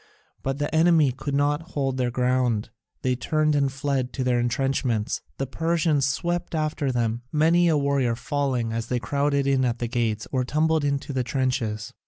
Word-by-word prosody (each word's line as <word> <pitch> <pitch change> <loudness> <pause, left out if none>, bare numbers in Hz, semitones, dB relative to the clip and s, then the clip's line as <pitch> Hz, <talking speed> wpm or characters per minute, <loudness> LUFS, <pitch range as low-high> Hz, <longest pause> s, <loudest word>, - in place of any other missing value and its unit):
But 135 0 -2
the 145 +1 -2
enemy 160 -3 +4
could 140 +2 -4
not 145 +2 +1
hold 135 -2 -1
their 125 -1 +1
ground; 125 -3 0 0.3
they 130 -1 +1
turned 155 +3 +1
and 140 -2 +2
fled 135 -2 -2
to 130 - -2
their 125 -1 +2
entrenchments. 120 -2 0 0.2
The 135 - -1
Persians 160 -1 +1
swept 175 +4 -2
after 155 -3 -1
them, 120 -1 -1
many 165 +3 +4
a 160 -2 +3
warrior 140 -4 +1
falling 125 -3 -1
as 115 0 -3
they 125 - 0
crowded 140 +2 0
in 135 -1 +2
at 120 -2 0
the 120 - -2
gates 115 -2 -1
or 130 -2 +1
tumbled 155 +3 +1
into 140 0 -1
the 130 -1 0
trenches. 125 -3 -2
135 Hz, 180 wpm, -25 LUFS, 125-145 Hz, 0.3 s, enemy